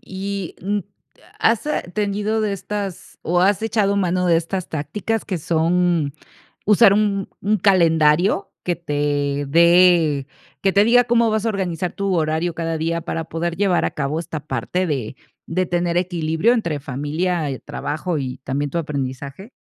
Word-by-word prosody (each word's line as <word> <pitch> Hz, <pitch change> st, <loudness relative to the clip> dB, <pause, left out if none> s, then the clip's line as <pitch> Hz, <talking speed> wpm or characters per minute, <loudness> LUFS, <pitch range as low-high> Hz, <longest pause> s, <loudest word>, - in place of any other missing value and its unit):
¿Y, 195 Hz, -1 st, -5 dB
mm, 205 Hz, +3 st, -1 dB, 0.6 s
has 225 Hz, -1 st, +2 dB, 0.3 s
tenido 210 Hz, +1 st, 0 dB
de 210 Hz, -2 st, 0 dB
estas, 200 Hz, -2 st, -5 dB
o 175 Hz, +2 st, +1 dB
has 195 Hz, +2 st, +3 dB
echado 215 Hz, -3 st, +1 dB
mano 180 Hz, -1 st, +1 dB
de 170 Hz, -2 st, +4 dB
estas 170 Hz, +2 st, -3 dB
tácticas, 180 Hz, +9 st, -3 dB
que 185 Hz, -4 st, -3 dB
son 165 Hz, -2 st, +1 dB, 0.5 s
usar 210 Hz, 0 st, +6 dB
un 200 Hz, -2 st, 0 dB
un 210 Hz, +2 st, +1 dB
calendario 175 Hz, 0 st, +3 dB
que 175 Hz, -, 0 dB
te 145 Hz, -3 st, -1 dB
dé, 170 Hz, -3 st, +4 dB, 0.3 s
que 195 Hz, -1 st, +2 dB
te 200 Hz, -, +5 dB
diga 245 Hz, +2 st, +5 dB
cómo 235 Hz, -1 st, +3 dB
vas 215 Hz, 0 st, 0 dB
a -, -, +2 dB
organizar 180 Hz, -4 st, -2 dB
tu 200 Hz, -1 st, -1 dB
horario 160 Hz, +1 st, 0 dB
cada 165 Hz, -1 st, -2 dB
día 165 Hz, +1 st, -1 dB
para 165 Hz, -1 st, -3 dB
poder 165 Hz, +1 st, -3 dB
llevar 190 Hz, -3 st, +2 dB
a -, -, -1 dB
cabo 150 Hz, +2 st, -2 dB
esta 165 Hz, -2 st, -5 dB
parte 140 Hz, +7 st, -2 dB
de 135 Hz, -6 st, -3 dB, 0.3 s
de 185 Hz, +2 st, 0 dB
tener 175 Hz, 0 st, 0 dB
equilibrio 175 Hz, +3 st, +1 dB
entre 170 Hz, -11 st, -1 dB
familia, 150 Hz, +5 st, -2 dB, 0.2 s
trabajo 155 Hz, +2 st, -3 dB
y 130 Hz, -1 st, -4 dB
también 140 Hz, +2 st, -1 dB
tu 170 Hz, -, -3 dB
aprendizaje? 140 Hz, -, -5 dB
175 Hz, 155 wpm, -21 LUFS, 155-200 Hz, 0.6 s, usar